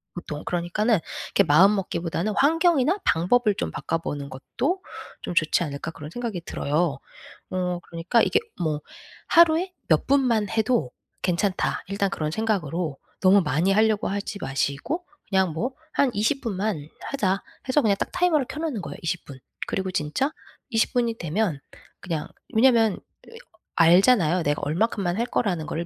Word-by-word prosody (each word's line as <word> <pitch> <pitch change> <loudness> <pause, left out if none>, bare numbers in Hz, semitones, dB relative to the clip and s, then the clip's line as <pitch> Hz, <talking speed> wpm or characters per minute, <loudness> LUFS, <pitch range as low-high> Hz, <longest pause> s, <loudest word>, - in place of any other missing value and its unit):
보통. 150 -3 -6
그러니까는 180 +6 +1 0.3
이렇게 200 - +3
마음먹기보다는 180 +2 +2
'환경이나 325 +2 +3
방법을 210 +6 +3
좀 80 - -2
바꿔 165 - -2
보는 145 -3 -5
것도 340 - -3 0.4
좀 - - -5
좋지 160 +2 +3
않을까.' 145 +1 -5
그런 150 -2 -9
생각이 230 -6 -4
들어요. 150 +1 -1 0.5
어 180 -1 -1
그러니까 170 +7 +1
이게 435 - +3 0.2
뭐 155 -2 -1 0.5
'하루에 340 +2 +5
몇 155 -2 +3
분만 245 -7 +2
해도 220 - +1 0.3
괜찮다.' 185 +2 0
일단 200 0 0
그런 155 -1 -2
생각으로 175 -8 -1 0.2
너무 195 +1 +6
많이 170 +4 +1
하려고 215 0 +2
하지 200 0 -4
마시고 140 - -2 0.2
그냥 190 -4 +2
뭐 240 - -2 0.2
'한 275 -3 +3
20 220 +7 0
분만 195 - -2 0.2
하자.' 195 -8 0 0.3
해서 290 +3 +4
그냥 205 -3 +3
딱 - - -2
타이머를 320 -7 +2
켜 305 - -6
놓는 295 - -2
거예요 145 -3 -7
20 170 +1 -2
분. 135 -2 -11 0.3
그리고 190 -1 -2
진짜 180 - -1 0.4
20 225 -3 +1
분이 235 -2 +1
되면 170 -2 -1 0.4
그냥 165 -4 -3 0.3
왜냐하면 225 -3 +4 0.3
이 - - -14
어 - - -13 0.4
알잖아요. 180 0 +5
내가 145 +1 0
얼마큼만 180 +3 0
할 235 - +1
거라는 175 -9 -1
거를 170 +2 -3
195 Hz, 325 characters per minute, -25 LUFS, 165-235 Hz, 0.5 s, 너무